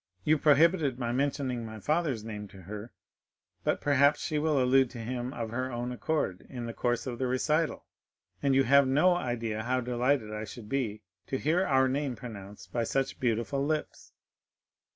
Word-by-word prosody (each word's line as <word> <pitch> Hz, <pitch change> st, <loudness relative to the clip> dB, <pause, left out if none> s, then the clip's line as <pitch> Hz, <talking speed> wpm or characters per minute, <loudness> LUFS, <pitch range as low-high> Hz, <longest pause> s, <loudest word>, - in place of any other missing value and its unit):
You 155 Hz, 0 st, +3 dB
prohibited 150 Hz, -2 st, +4 dB
my 120 Hz, -2 st, -2 dB
mentioning 130 Hz, -2 st, -1 dB
my 110 Hz, -1 st, -7 dB
father's 150 Hz, -, 0 dB
name 105 Hz, -2 st, -6 dB
to 95 Hz, -1 st, -14 dB
her, 105 Hz, +5 st, -7 dB, 0.7 s
but -, -, +1 dB
perhaps 145 Hz, 0 st, +4 dB
she 150 Hz, -, -1 dB
will 150 Hz, -2 st, +2 dB
allude 130 Hz, 0 st, +4 dB
to 120 Hz, -, -10 dB
him 120 Hz, +2 st, -4 dB
of 115 Hz, -4 st, -5 dB
her 130 Hz, +2 st, -2 dB
own 120 Hz, +1 st, -3 dB
accord 125 Hz, -, -2 dB
in 120 Hz, -3 st, -5 dB
the 115 Hz, -, -5 dB
course 120 Hz, 0 st, -1 dB
of 125 Hz, -3 st, -5 dB
the 130 Hz, -, 0 dB
recital, 150 Hz, +6 st, 0 dB, 0.6 s
and 140 Hz, -2 st, +2 dB
you 135 Hz, -, +5 dB
have 140 Hz, +2 st, +5 dB
no 150 Hz, +8 st, +4 dB
idea 115 Hz, -7 st, -2 dB
how 125 Hz, +3 st, 0 dB
delighted 125 Hz, -2 st, 0 dB
I 105 Hz, 0 st, -4 dB
should 110 Hz, 0 st, -10 dB
be 110 Hz, -5 st, -2 dB, 0.2 s
to 135 Hz, -, -1 dB
hear 165 Hz, +7 st, +2 dB
our 130 Hz, -1 st, +4 dB
name 135 Hz, -1 st, -1 dB
pronounced 100 Hz, -4 st, -10 dB
by 120 Hz, -, +1 dB
such 135 Hz, +3 st, -1 dB
beautiful 120 Hz, +3 st, 0 dB
lips." 155 Hz, +1 st, -3 dB
125 Hz, 180 wpm, -29 LUFS, 115-140 Hz, 0.7 s, you